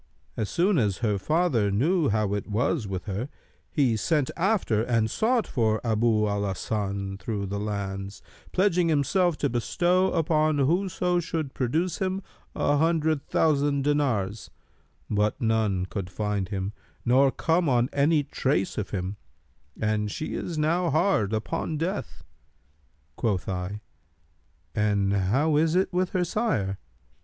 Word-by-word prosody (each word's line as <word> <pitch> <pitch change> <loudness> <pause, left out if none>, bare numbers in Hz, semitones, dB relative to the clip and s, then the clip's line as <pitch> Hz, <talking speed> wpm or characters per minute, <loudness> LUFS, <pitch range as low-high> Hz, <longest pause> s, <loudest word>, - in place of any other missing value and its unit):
As 110 - -2
soon 180 -1 +2
as 105 -5 +1
her 105 -2 +1
father 150 - +1
knew 150 - +2
how 105 -1 +1
it 105 - -3
was 120 +3 0
with 95 -2 -4
her, 105 +7 -3 0.4
he 130 -6 +2
sent 145 +5 0
after 175 - +1
and 115 -2 +1
sought 230 0 +1
for 110 -4 +1
Abu 110 -1 +2
al 100 0 -1
Hasan 100 0 -3
through 100 0 -3
the 100 +1 -3
lands, 100 -1 -4 0.3
pledging 180 -3 +2
himself 165 +3 +2
to - - +1
bestow 175 +10 +1
upon 155 -2 +2
whoso 175 +4 +1
should 160 -5 -3
produce 160 +8 -1
him 190 0 -1 0.3
an 145 0 +2
hundred 160 -2 +1
thousand 145 -2 +2
dinars; 120 -9 0 0.6
but 105 0 0
none 110 -5 +1
could 95 -1 -5
find 105 -1 -2
him 100 0 -3 0.3
nor 130 +3 +5
come 165 +2 +1
on 120 -1 +3
any 145 +2 +3
trace 115 -9 -1
of 105 - -4
him; 95 +1 -3 0.6
and 105 -1 0
she 155 - -4
is 170 - -4
now 165 +3 +1
hard 155 - +2
upon 150 +8 -2
death.' 180 +6 -4 0.9
Quoth 105 -7 -1
I, 95 +2 -4 0.9
'And 100 -2 +1
how 130 +11 +2
is 160 +2 +2
it 190 0 +1
with 180 0 +1
her 185 - +2
sire?' 165 - -1
125 Hz, 140 wpm, -26 LUFS, 105-165 Hz, 0.9 s, nor